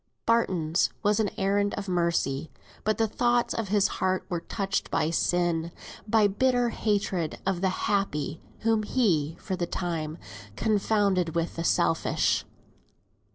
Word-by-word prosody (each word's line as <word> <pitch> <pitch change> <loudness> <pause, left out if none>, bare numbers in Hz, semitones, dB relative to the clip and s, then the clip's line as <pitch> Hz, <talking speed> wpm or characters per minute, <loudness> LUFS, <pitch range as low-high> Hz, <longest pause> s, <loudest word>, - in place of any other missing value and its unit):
Barton's 185 -8 +2
was 205 0 +3
an 215 -2 +2
errand 200 +1 +1
of 200 0 -5
mercy; 170 -5 0 0.3
but 215 0 +1
the 225 - +2
thoughts 240 +2 +1
of 225 -2 -2
his 200 0 +3
heart 185 0 +1
were 175 - -1
touched 195 0 -2
by 160 - +1
sin, 170 -1 +1 0.4
by 215 0 +4
bitter 245 +4 +2
hatred 200 -7 -1
of 190 -2 0
the 190 - +2 0.2
happy, 165 -7 -1 0.2
whom 225 -1 +2
he, 170 - +1
for 190 - -3
the 175 -1 -2
time, 165 -3 -3 0.4
confounded 200 - +1
with 170 0 -1
the 165 - -3
selfish. 165 -1 +1
195 Hz, 140 wpm, -27 LUFS, 170-210 Hz, 0.4 s, by